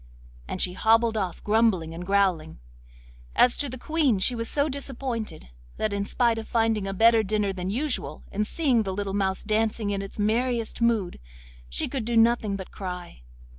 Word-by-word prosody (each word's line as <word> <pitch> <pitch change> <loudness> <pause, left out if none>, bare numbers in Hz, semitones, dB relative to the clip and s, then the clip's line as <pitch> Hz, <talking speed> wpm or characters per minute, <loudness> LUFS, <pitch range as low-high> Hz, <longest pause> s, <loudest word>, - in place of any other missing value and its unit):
And - - -4
she 180 - +2
hobbled 225 +3 +3
off 190 -5 -3
grumbling 210 -7 +2
and 170 +2 -6
growling. 185 -5 +1 0.8
As 245 - +5
to 285 - -1
the 255 - -6
Queen, 290 -4 +1
she 195 +6 +3
was 230 -1 -3
so 285 0 +1
disappointed 260 - -4 0.3
that, 215 -1 -1
in 200 0 -1
spite 230 +1 +1
of 220 - -8
finding 225 -3 +1
a - - -2
better 225 +2 +5
dinner 210 -1 0
than 185 0 -4
usual, 240 - -2
and 210 +1 -1
seeing 265 -7 +2
the 195 -3 -3
little 200 -1 -3
mouse 190 -1 0
dancing 215 -1 0
in 200 -1 -2
its 195 - -8
merriest 230 +2 0
mood, 225 -6 +1 0.5
she - - -2
could 265 -4 -3
do 235 0 0
nothing 225 -3 +3
but 190 -2 -8
cry. 180 - -7
215 Hz, 180 wpm, -26 LUFS, 195-235 Hz, 0.8 s, As